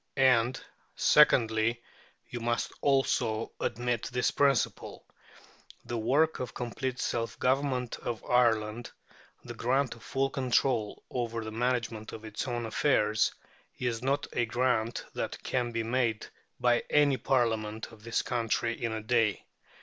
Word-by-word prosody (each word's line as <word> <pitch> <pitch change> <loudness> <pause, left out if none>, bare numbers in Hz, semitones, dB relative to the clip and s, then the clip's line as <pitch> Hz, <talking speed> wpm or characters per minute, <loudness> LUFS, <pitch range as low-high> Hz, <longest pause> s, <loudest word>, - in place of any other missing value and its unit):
And, 130 -1 +4 0.4
secondly, 115 -5 +4 0.4
you 120 - -6
must 120 0 -1
also 125 -5 +1
admit 120 -1 -1
this 125 0 +1
principle: 140 -4 0 0.8
the 120 - -4
work 145 +8 +2
of 125 -3 -5
complete 125 +1 -3
self 115 0 -2
government 130 -2 0
of 120 -2 -5
Ireland, 115 -2 +2 0.6
the 120 - -6
grant 130 +3 0
of 115 - -16
full 135 0 -1
control 125 -4 0
over 115 -2 -2
the 110 - -6
management 115 -2 -2
of 110 0 -8
its 110 +3 -4
own 120 -2 -2
affairs, 110 -2 +2 0.5
is 120 -2 -2
not 140 +2 0
a 120 - +1
grant 120 -1 0
that - - -3
can 120 -2 -1
be 115 -1 -1
made 115 -2 0 0.3
by 120 -1 +3
any 145 -2 +4
Parliament 110 -4 0
of 105 -2 -16
this 115 0 -1
country 115 0 -1
in 115 - 0
a 110 -1 -4
day. 115 -2 +1
120 Hz, 135 wpm, -30 LUFS, 115-130 Hz, 0.8 s, And